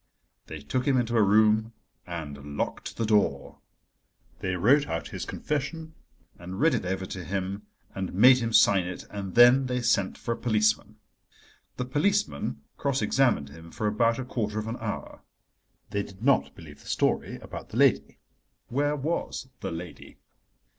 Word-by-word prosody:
They 80 - -7
took 125 - -2
him 135 -2 +3
into 120 -1 0
a 115 - +5
room 110 +2 +3 0.3
and 75 -4 -7
locked - - -4
the 115 - 0
door. 105 -2 +1 0.8
They 95 -1 -2
wrote 135 +11 +4
out 80 - -4
his - - -5
confession 160 +2 -4 0.5
and 90 +2 -7
read 160 +4 +4
it 90 - -1
over 95 0 -2
to 95 -1 -6
him, 100 +3 -4 0.3
and 95 -1 -4
made 125 +7 +6
him 115 -1 -2
sign 100 -4 +5
it, 90 - -7
and 100 -2 -6
then 120 +3 +7
they 125 0 -1
sent 105 -5 +1
for 115 - -4
a - - -7
policeman. 105 -2 +1 0.8
The 125 - -2
policeman 145 - 0
cross 140 -1 0
examined 120 - +2
him 80 +3 -12
for 110 - -5
about 115 +2 +2
a 130 - -4
quarter 110 -4 -3
of 110 - -2
an 115 +2 -4
hour. 110 -2 -6 0.7
They 100 - 0
did 100 +1 -11
not 140 -1 +2
believe 75 -4 -13
the - - -16
story - - 0
about - - -9
the - - -6
lady. - - +3 0.5
Where 145 +3 +1
was 145 -2 -3
the - - -4
lady? 85 0 -9
110 Hz, 165 wpm, -27 LUFS, 95-125 Hz, 0.8 s, then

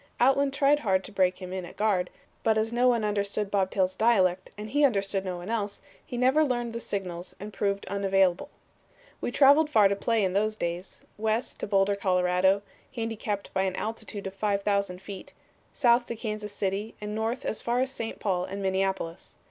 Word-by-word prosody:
Outland 270 +2 +4
tried 280 +1 +3
hard 190 -6 +1
to - - -8
break 185 -2 +2
him 185 -1 -7
in 190 -1 -3
at 175 - -10
guard, 200 -4 +1 0.3
but 220 -1 +2
as 220 +1 0
no 245 +1 +3
one 235 -3 +3
understood 205 0 -1
Bob 195 -2 +2
Tail's 185 -1 0
dialect, 190 -5 +2
and 210 +1 -7
he 290 +3 +2
understood 195 -6 +2
no 185 -2 -4
one 175 +5 -6
else, 205 -3 -2 0.2
he 245 - -6
never 260 +5 +4
learned 240 -4 -1
the 235 - -3
signals, 180 -5 -4
and 210 +1 -8
proved 200 -1 -1
unavailable. 195 -2 +1 0.7
"We - - -1
traveled 290 +4 +6
far 215 -9 +6
to 200 - +1
play 225 +2 +1
in 185 -1 0
those 215 +2 +1
days; 175 -1 -4 0.2
west 220 +2 -1
to - - -3
Boulder, 200 0 +3
Colorado, 185 0 +2 0.3
handicapped 225 -3 -3
by 190 - +1
an 190 -1 0
altitude 220 -2 -5
of 190 - -4
5000 200 -2 0
feet, 195 0 -9 0.4
south 240 -1 +3
to 235 - -4
Kansas 215 -2 -4
City 205 +2 -3
and 210 0 -5
north 225 +4 -2
as 220 - -1
far 240 +1 0
as 260 +1 0
St. 230 -4 -5
Paul 185 -3 0
and 195 +1 -6
Minneapolis. 190 -2 -2
205 Hz, 195 wpm, -27 LUFS, 190-230 Hz, 0.7 s, traveled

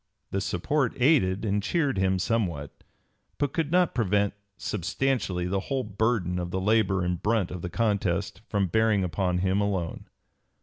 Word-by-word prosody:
This 95 -1 -1
support 130 - 0
aided 115 -8 +3
and 105 0 +1
cheered 140 - 0
him 95 0 +2
somewhat, 90 -8 -1 0.7
but 145 - -1
could 160 -2 -1
not 180 -1 +3
prevent 100 -3 +1 0.2
substantially 100 -1 -1
the 95 +2 0
whole 135 -2 0
burden 100 -4 0
of 90 0 -3
the 95 - -2
labor 100 -2 +2
and 90 -1 -1
brunt 105 -3 +1
of 90 - -5
the 90 - -4
contest 100 -4 0
from 100 -2 +1
bearing 110 +2 +2
upon 90 0 0
him 95 +2 +1
alone. 95 -5 -2
100 Hz, 160 wpm, -27 LUFS, 90-115 Hz, 0.7 s, aided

